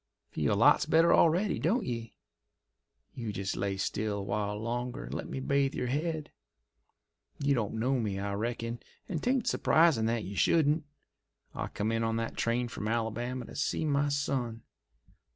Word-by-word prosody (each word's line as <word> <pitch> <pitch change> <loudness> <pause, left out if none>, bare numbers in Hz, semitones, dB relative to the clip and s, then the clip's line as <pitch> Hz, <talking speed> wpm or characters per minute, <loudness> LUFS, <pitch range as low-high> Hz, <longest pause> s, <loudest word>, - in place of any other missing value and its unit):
Feel - - +1
lots - - +5
better 165 +2 +5
already, 175 +5 +3
don't 215 - +1
ye! 115 -3 -4 1.0
You 115 -4 -4
just 95 -1 -3
lay 100 -1 -1
still 105 +2 -1
a 100 - -3
while 105 +1 -2
longer 120 +2 -3
and - - -7
let - - -4
me - - -4
bathe 140 0 +1
your 125 - -2
head. 155 +2 -2 1.1
You 140 0 +2
don't 115 -5 -1
know 125 +4 +1
me, 105 -4 -2
I 100 +1 -2
reckon, 115 +2 -3 0.3
and 165 -5 -3
'tain't 250 -1 +1
surprisin' 155 -9 +3
that 115 -1 0
you 100 +2 -6
shouldn't. 155 - +3 0.7
I - - -3
come 105 +2 -2
in 115 0 0
on 115 0 0
that 115 0 -2
train 120 +1 0
from 110 -2 -5
Alabama 120 +3 -2
to - - -11
see 145 +2 -1
my 145 -1 +2
son. 130 -5 -1
120 Hz, 170 wpm, -30 LUFS, 110-145 Hz, 1.1 s, lots